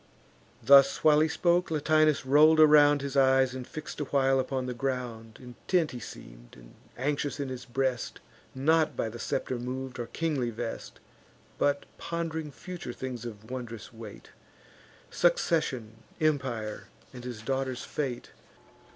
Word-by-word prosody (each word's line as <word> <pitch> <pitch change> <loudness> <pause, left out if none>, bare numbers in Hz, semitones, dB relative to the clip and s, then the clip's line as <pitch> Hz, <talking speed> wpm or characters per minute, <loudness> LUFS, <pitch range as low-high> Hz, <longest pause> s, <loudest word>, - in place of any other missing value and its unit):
Thus 140 -1 +6
while 150 -1 +6
he 155 - +4
spoke, 175 +3 +1
Latinus 155 -1 +2
roll'd 155 +4 +6
around 145 -2 +6
His 140 -1 -4
eyes, 130 -1 +4
and 130 -1 -7
fix'd 155 -1 -7
a - - -1
while 135 -1 +2
upon 130 0 -2
the 125 - -3
ground. 120 -3 -4
Intent 150 +7 -1
he 125 - -7
seem'd, - - -12
and - - -16 0.2
anxious 145 +2 -2
in 140 -2 -3
his 125 -2 -7
breast; 130 0 -2 0.4
Not 155 +4 +2
by 110 - -1
the 120 +2 -9
scepter 125 +1 -2
mov'd, 130 +1 -5
or 120 - -4
kingly 150 -7 -1
vest, 115 0 -6 0.6
But 140 0 +1
pond'ring 160 -2 -4
future 175 -3 -8
things 125 -2 -6
of 110 0 -9
wondrous 120 -4 -7
weight; 110 -2 -11 0.8
Succession, 155 - +1 0.2
empire, 130 -8 -1 0.3
and 125 -1 -9
his 120 -3 -7
daughter's 130 0 -2
fate. 135 -5 -4
130 Hz, 140 wpm, -28 LUFS, 120-150 Hz, 0.8 s, Thus